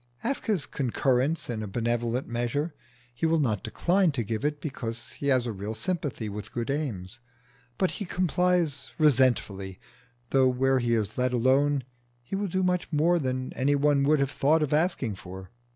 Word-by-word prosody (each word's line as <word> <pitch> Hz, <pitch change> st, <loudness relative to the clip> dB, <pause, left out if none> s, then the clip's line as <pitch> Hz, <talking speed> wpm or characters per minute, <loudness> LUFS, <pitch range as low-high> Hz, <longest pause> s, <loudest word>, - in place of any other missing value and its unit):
Ask 275 Hz, -, -2 dB
his 200 Hz, -9 st, +1 dB
concurrence 135 Hz, +3 st, 0 dB
in 115 Hz, -3 st, -3 dB
a 105 Hz, -, -4 dB
benevolent 120 Hz, +3 st, -1 dB
measure: 120 Hz, +7 st, -2 dB, 0.4 s
he 160 Hz, +7 st, 0 dB
will 165 Hz, +1 st, +3 dB
not 110 Hz, -9 st, +1 dB
decline 180 Hz, -1 st, +2 dB
to 120 Hz, -4 st, -1 dB
give 110 Hz, +1 st, -3 dB
it, 150 Hz, 0 st, 0 dB
because 120 Hz, -4 st, -5 dB
he 140 Hz, -, -5 dB
has 130 Hz, -3 st, +3 dB
a 120 Hz, -, -2 dB
real 105 Hz, +2 st, -5 dB
sympathy 145 Hz, -, -3 dB
with 105 Hz, +1 st, -6 dB
good 120 Hz, +2 st, -2 dB
aims; 120 Hz, -7 st, -4 dB, 0.6 s
but 185 Hz, -, +1 dB
he 205 Hz, -, -4 dB
complies 175 Hz, -7 st, 0 dB
resentfully, 120 Hz, -10 st, +2 dB, 0.5 s
though 135 Hz, -1 st, +5 dB
where 130 Hz, +1 st, +2 dB
he 120 Hz, -1 st, +1 dB
is 110 Hz, +1 st, -2 dB
let 125 Hz, 0 st, +1 dB
alone 135 Hz, +3 st, +3 dB, 0.4 s
he 125 Hz, -, -5 dB
will 200 Hz, +1 st, -1 dB
do 190 Hz, +1 st, 0 dB
much 180 Hz, -1 st, 0 dB
more 170 Hz, +3 st, +3 dB
than 130 Hz, -2 st, -2 dB
any 140 Hz, +2 st, +2 dB
one 145 Hz, 0 st, +3 dB
would 150 Hz, +2 st, +3 dB
have 140 Hz, 0 st, +1 dB
thought 155 Hz, +3 st, +3 dB
of 150 Hz, -, -1 dB
asking 150 Hz, -, +1 dB
for. 95 Hz, 0 st, -10 dB
130 Hz, 180 wpm, -27 LUFS, 115-155 Hz, 0.6 s, though